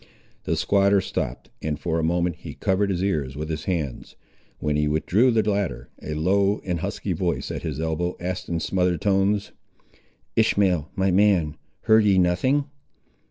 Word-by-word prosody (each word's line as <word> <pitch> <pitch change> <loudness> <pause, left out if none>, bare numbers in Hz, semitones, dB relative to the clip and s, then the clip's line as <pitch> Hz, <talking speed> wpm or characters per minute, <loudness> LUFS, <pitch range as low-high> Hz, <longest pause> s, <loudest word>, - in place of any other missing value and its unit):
The - - 0
squatter 100 0 +3
stopped, - - -4
and 75 -1 -2
for 85 -2 -1
a - - -1
moment 85 +1 0
he - - -9
covered 100 +1 +1
his 95 -1 -1
ears 75 -9 -1
with 75 +2 -5
his 80 0 -4
hands. 80 -9 -3 0.4
When 75 -1 -1
he 75 0 +1
withdrew 90 +11 +2
the 110 -3 +2
latter, 100 - -1
a 75 - -4
low 100 +6 +2
and 90 -3 -1
husky - - -3
voice - - -2
at - - -4
his - - -4
elbow 80 +2 -1
asked 90 +1 -4
in 85 -1 -1
smothered 90 -2 0
tones— 100 +1 +1 0.8
"Ishmael, 95 -8 +2
my 95 0 +1
man, 90 -6 +3 0.3
heard 110 0 +5
ye 100 -2 +4
nothing?" 95 +11 +2
90 Hz, 165 wpm, -24 LUFS, 80-100 Hz, 0.8 s, heard